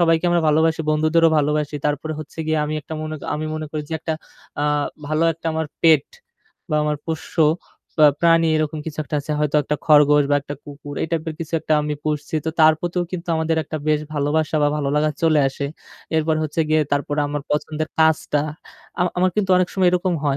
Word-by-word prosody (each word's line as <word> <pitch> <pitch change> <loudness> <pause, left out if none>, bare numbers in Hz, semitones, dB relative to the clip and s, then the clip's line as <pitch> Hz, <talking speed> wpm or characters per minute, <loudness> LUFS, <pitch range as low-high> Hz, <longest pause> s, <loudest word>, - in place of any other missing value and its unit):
সবাইকে 165 0 +3
আমরা 175 -1 +2
ভালোবাসি, 160 +1 +2
বন্ধুদেরও 155 +2 +3
ভালোবাসি। 150 0 0
তারপরে 150 +2 -2
হচ্ছে 155 +1 -12
গিয়ে 155 0 +1
আমি 150 - -3
একটা 150 +2 -8
মনে 155 0 -4 0.2
আমি 150 +1 -3
মনে 155 0 -4
করি 155 -1 -3
যে - - -7
একটা 160 0 -2 0.5
আ - - +1 0.4
ভালো 155 +2 0
একটা 165 +1 -9
আমার 160 0 -2 0.2
পেট 155 -4 +5 0.6
বা 155 - -1
আমার 150 0 0
পোষ্য 160 -2 -5 0.6
বা 155 - +8
প্রাণী 165 0 +4
এরকম 155 0 -1
কিছু 155 -1 -6
একটা 150 - -6
আছে। 145 - -8
হয়তো 150 0 +1
একটা 150 +2 -2
খরগোশ 150 -1 +5
বা 145 - +5
একটা 145 +1 -7
কুকুর 145 0 -9
এই - - 0
টাইপের 160 -1 -2
কিছু 165 0 -6
একটা - - -2
আমি 150 0 -2
পুষছি। 150 0 -3
তো - - +1
তার 155 0 +8
প্রতিও 175 0 -1
কিন্তু 175 -1 -5
আমাদের 160 0 0
একটা 155 - -5
বেশ 150 -1 +3
ভালোবাসা 150 +2 0
বা 145 - +4
ভালোলাগা 150 +1 +1
চলে 160 -2 +4
আসে। 135 +1 -5 0.5
এরপর 160 0 +2
হচ্ছে 155 +1 -2
গিয়ে 155 0 +3
তারপরে 145 +1 0
আমার 145 0 -3
পছন্দের 155 +1 -2
কাজটা 160 -2 +3 0.6
আমা 180 0 +2
আমার 185 +1 +3
কিন্তু 200 -3 +1
অনেক 180 -1 +2
সময় 185 -2 +3
এরকম 180 0 0
হয়। 140 -2 +1
155 Hz, 200 wpm, -21 LUFS, 150-160 Hz, 0.6 s, বা